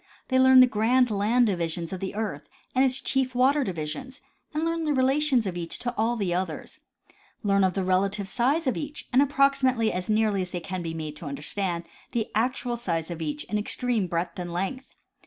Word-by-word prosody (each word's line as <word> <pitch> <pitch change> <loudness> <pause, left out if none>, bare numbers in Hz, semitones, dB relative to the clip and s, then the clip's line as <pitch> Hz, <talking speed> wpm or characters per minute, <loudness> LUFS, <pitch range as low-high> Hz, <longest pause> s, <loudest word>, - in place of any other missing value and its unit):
They 260 -1 +3
learn 260 0 +8
the - - +9
grand 245 +2 +2
land 215 +5 +3
divisions 170 -3 -2
of 185 - -4
the 190 +1 -5
earth 210 -10 -4 0.2
and 260 - +4
its 260 0 +1
chief 260 -2 0
water 275 +3 +3
divisions 190 - -5 0.3
and 310 +1 -1
learn 330 0 -1
the 300 -2 +1
relations 265 -1 +3
of 185 -2 -3
each 170 -1 -3
to 240 0 -3
all 225 +3 +1
the 195 -6 -1
others; 185 +1 -4 0.6
learn 200 -1 +3
the 190 0 +1
relative 195 +2 +1
size 260 +10 +1
of 260 - +1
each 295 0 -5
and 260 - +6
approximately 275 -5 +2
as 180 0 -3
as - - -11
nearly 215 -2 +2
as 180 - -4
they 180 - -4
can 185 +1 -5
be 165 -1 -4
made 155 -2 -5
to 155 - -7
understand 170 +5 -2 0.3
the 230 -2 -1
actual 240 +2 0
size 170 -7 -2
of 170 -1 -6
each 150 -1 -3
in 210 +8 -2
extreme 225 -1 -1
breadth 170 +1 -3
and 175 -1 -4
length. 195 +10 -3
215 Hz, 205 wpm, -26 LUFS, 180-260 Hz, 0.6 s, the